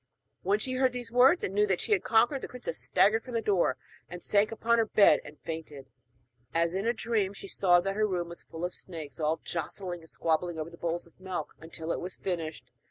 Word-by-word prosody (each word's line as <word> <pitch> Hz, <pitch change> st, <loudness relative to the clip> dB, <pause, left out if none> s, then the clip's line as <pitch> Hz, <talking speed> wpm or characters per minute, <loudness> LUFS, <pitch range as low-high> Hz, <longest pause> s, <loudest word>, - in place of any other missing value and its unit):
When 200 Hz, +3 st, +2 dB
she 255 Hz, +4 st, -2 dB
heard 255 Hz, -1 st, +2 dB
these 245 Hz, -2 st, -5 dB
words 260 Hz, +8 st, +5 dB
and 190 Hz, -, -2 dB
knew 210 Hz, +1 st, +3 dB
that 190 Hz, -3 st, +1 dB
she 230 Hz, -, -3 dB
had 200 Hz, -, +3 dB
conquered, 240 Hz, +5 st, +3 dB
the -, -, -5 dB
princess 250 Hz, -, -5 dB
staggered 220 Hz, +3 st, +3 dB
from 250 Hz, -2 st, -7 dB
the -, -, +3 dB
door, 185 Hz, -11 st, +2 dB, 0.3 s
and 175 Hz, 0 st, -8 dB
sank 210 Hz, +1 st, +3 dB
upon 235 Hz, +1 st, +2 dB
her 225 Hz, -, +3 dB
bed 205 Hz, -1 st, +6 dB
and 150 Hz, -, -12 dB
fainted. 155 Hz, -4 st, -6 dB, 0.7 s
As 170 Hz, +1 st, +2 dB
in 195 Hz, +4 st, -1 dB
a -, -, +4 dB
dream, 220 Hz, -4 st, 0 dB
she 195 Hz, -, -8 dB
saw 180 Hz, -2 st, +4 dB
that 195 Hz, +2 st, -2 dB
her 215 Hz, 0 st, +2 dB
room 175 Hz, -3 st, -2 dB
was 170 Hz, -, -7 dB
full 165 Hz, +2 st, -6 dB
of 180 Hz, -, -4 dB
snakes, 160 Hz, -7 st, -8 dB
all 155 Hz, +1 st, +1 dB
jostling 175 Hz, +2 st, -4 dB
and 160 Hz, -1 st, -14 dB
squabbling 165 Hz, +1 st, 0 dB
over 160 Hz, +1 st, -4 dB
the 170 Hz, -, -12 dB
bowls 170 Hz, 0 st, -2 dB
of 170 Hz, -, -24 dB
milk 185 Hz, -1 st, -5 dB
until 160 Hz, 0 st, -6 dB
it -, -, -1 dB
was 180 Hz, +1 st, -5 dB
finished. 165 Hz, -8 st, -4 dB
185 Hz, 235 wpm, -29 LUFS, 165-220 Hz, 0.7 s, bed